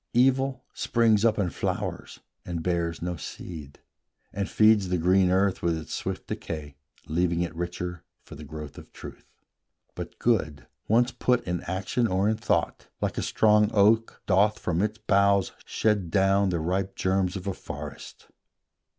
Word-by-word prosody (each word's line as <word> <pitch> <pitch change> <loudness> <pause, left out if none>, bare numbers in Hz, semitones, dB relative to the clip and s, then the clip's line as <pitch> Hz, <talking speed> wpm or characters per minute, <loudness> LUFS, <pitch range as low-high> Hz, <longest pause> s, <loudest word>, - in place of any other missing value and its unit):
Evil 130 +1 +2
springs 115 -3 +2
up, 115 -2 +3
and 95 -5 -1
flowers, - - -4 0.2
and 85 -2 -4
bears 85 -2 -1
no 90 0 -3
seed, 75 -3 -9 0.5
And 100 0 -2
feeds 110 -3 +4
the 90 - +1
green 90 +2 +3
earth 95 +1 +2
with 85 -1 +1
its 80 - -7
swift - - -4
decay, 75 -4 -6 0.3
Leaving 85 +2 0
it 85 -2 -2
richer 90 0 -4 0.2
for - - -13
the 75 - -9
growth 75 -1 -8
of - - -15
truth; - - -11 0.7
But - - -7
Good, 80 - 0 0.2
once 120 +3 +3
put 125 0 +1
in 90 -1 -3
action 95 +6 0
or 95 +1 +1
in 110 0 +1
thought, - - -1
Like - - -2
a - - -1
strong 105 -1 +3
oak, 110 +3 +3
doth 105 +3 +3
from 90 -5 -1
its 105 +1 -1
boughs 100 -3 +2
shed 105 -5 0
down 95 +2 +3
The 85 -2 -1
ripe 95 +4 -1
germs 95 -1 0
of 95 -1 -6
a 100 - -1
forest. - - -9
95 Hz, 160 wpm, -26 LUFS, 85-105 Hz, 0.7 s, feeds